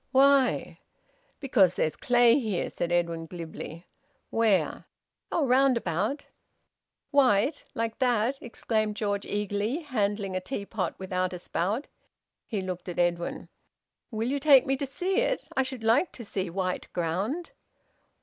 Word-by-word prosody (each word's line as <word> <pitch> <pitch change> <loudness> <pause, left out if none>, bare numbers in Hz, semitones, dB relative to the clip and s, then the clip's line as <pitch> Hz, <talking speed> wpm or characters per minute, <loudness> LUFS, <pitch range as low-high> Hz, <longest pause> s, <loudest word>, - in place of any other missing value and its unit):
"Why?" 275 -1 +3 0.6
"Because 205 - +3
there's 155 -1 0
clay 245 +1 +4
here," 215 -8 -2
said 175 - -3
Edwin 170 -1 0
glibly. 165 0 -8 0.5
"Where?" 210 -8 +1 0.5
"Oh! 320 - +2
Round 260 0 +4
about." 205 - -1 0.9
"White, 275 0 +3
like 230 +1 -2
that?" 250 +1 +1
exclaimed 215 -2 -1
George 205 -2 -1
eagerly, 205 - -1
handling 205 - -1
a 185 - -1
teapot 200 -2 -3
without 185 -1 -2
a - - -4
spout. 200 - -2 0.6
He 205 -5 -2
looked 185 -1 -5
at 175 - -6
Edwin: 175 -1 -1 0.6
"Will 225 0 -2
you 280 +1 0
take 275 -2 +6
me 270 -1 +1
to 280 - -3
see 365 +8 -2
it? - - 0
I - - +3
should 260 -3 -5
like 230 +10 +3
to 235 - -8
see 190 -2 -3
white 185 +1 -3
ground." 195 - -2
215 Hz, 140 wpm, -28 LUFS, 185-265 Hz, 0.9 s, take